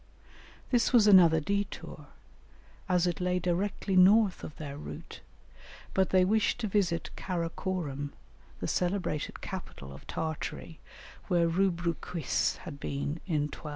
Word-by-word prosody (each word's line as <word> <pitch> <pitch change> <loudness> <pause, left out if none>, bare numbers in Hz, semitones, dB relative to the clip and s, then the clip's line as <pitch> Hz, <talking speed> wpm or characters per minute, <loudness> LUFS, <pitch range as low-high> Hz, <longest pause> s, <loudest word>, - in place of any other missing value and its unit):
This 240 -3 +3
was 235 -5 +6
another 175 -6 +7
détour, 200 +5 -4 0.8
as 180 -1 +3
it 175 0 -1
lay 180 0 +1
directly 185 +2 -1
north 195 +2 +5
of 150 - -7
their 145 -3 -7
route, 145 - -9 0.7
but 190 -1 +2
they 185 -1 +4
wished 215 +3 +2
to 220 - 0
visit 185 -5 0
Kara 170 -3 -3
Korum, 145 -8 -3 0.5
the - - -2
celebrated 175 -4 -1
capital 70 0 -7
of 70 - -13
Tartary, 160 0 -4 0.5
where 175 -3 +3
Rubruquis 170 -4 0
had 150 -6 -8
been 145 +4 -3
in 155 -5 +1
1254. 155 - -8
180 Hz, 130 wpm, -30 LUFS, 160-190 Hz, 0.8 s, another